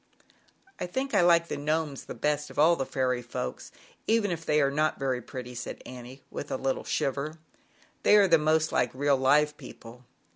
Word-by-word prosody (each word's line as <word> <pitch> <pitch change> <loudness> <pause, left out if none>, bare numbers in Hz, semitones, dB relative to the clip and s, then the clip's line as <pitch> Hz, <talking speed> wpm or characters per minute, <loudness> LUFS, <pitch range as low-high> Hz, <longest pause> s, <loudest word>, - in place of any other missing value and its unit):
" 385 - -33
I - - -2
think 265 +9 -3
I - - +5
like 170 -1 +4
the - - -4
Gnomes 150 -1 -2
the - - -7
best 150 +4 -1
4 - - -11
of - - -20
all 160 +3 +5
the 135 -4 -3
fairy 125 -2 0
folks, 120 - -6 0.4
even 220 -3 +2
if 165 -1 -4
they 150 -1 +2
are 140 -2 +2
not 155 +2 0
very 130 -2 -1
pretty," 125 0 -8
said 120 - -7
Annie, 125 +1 -10
with 145 - -6
a - - -2
little 135 0 -2
shiver. 140 +4 -2 0.6
"They - - +5
are 205 -2 +6
the 165 -3 +5
most 155 +1 +2
like 125 - +2
real 140 +1 +2
live 150 +3 +3
people." 120 +2 -12
145 Hz, 210 wpm, -28 LUFS, 130-160 Hz, 0.6 s, are